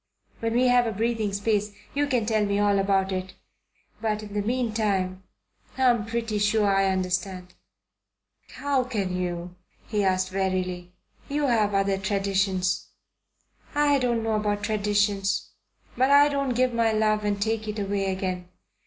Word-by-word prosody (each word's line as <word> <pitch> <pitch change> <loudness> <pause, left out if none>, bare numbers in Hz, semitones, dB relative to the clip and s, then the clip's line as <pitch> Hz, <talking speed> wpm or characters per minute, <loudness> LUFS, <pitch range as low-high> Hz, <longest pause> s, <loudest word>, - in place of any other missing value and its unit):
"When 230 0 -1
we 250 +1 +4
have 245 -1 +4
a - - -1
breathing 220 0 -1
space 205 +1 0 0.2
you 290 +1 +1
can 250 -5 +1
tell 215 -1 +1
me 200 -1 0
all 205 -1 +3
about 195 -1 +1
it. 185 0 -4 0.7
But 215 -1 -1
in 205 -1 -9
the 205 - 0
meantime 210 -5 -1 0.6
I'm 240 -4 +3
pretty 230 -2 -2
sure 210 +1 +2
I 195 0 +3
understand." 185 0 -2 1.0
"How 280 -2 0
can 205 -7 -2
you?" 175 -1 -4 0.3
he 210 -2 -1
asked 185 -1 +1
wearily. 185 -2 -2 0.4
"You 290 +1 0
have 215 -5 +2
other 195 0 +1
traditions." 195 -1 0 0.9
"I 290 -1 +3
don't 240 -3 0
know 225 0 0
about 210 -1 -1
traditions; 205 -2 0 0.4
but 260 +2 +2
I 285 +1 +7
don't 275 -3 -1
give 255 0 +2
my 230 -1 +2
love 215 -1 +1
and 205 -1 -1
take 220 +1 -1
it 210 0 -4
away 200 -1 -1
again. 185 -1 -3
205 Hz, 155 wpm, -26 LUFS, 195-230 Hz, 1.0 s, I